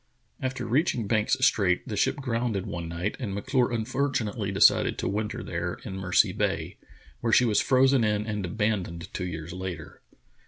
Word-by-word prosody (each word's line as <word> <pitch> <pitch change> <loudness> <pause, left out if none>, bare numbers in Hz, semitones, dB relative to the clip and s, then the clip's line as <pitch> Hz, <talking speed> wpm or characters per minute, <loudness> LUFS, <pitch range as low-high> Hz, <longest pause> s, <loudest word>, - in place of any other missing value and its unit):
After 130 0 -3
reaching 130 -3 +1
Banks 105 +1 +1
Strait 90 -4 +2
the 105 - -3
ship - - +2
grounded 115 -7 -2
one 85 -1 -5
night 85 +5 -3
and 105 -7 -4
M'Clure 125 +5 +1
unfortunately 115 -3 -1
decided 95 - +4
to - - -2
winter 105 +2 -2
there, 85 +1 -3
in 100 -5 -6
Mercy 95 -1 +2
Bay, - - -2 0.4
where 115 - -1
she 125 - +5
was 110 -3 +3
frozen 130 -1 +4
in 105 -1 +1
and 105 -2 -3
abandoned 95 -4 -2
two 90 - -3
years 80 0 -6
later. 95 -1 -7
105 Hz, 165 wpm, -27 LUFS, 95-120 Hz, 0.4 s, she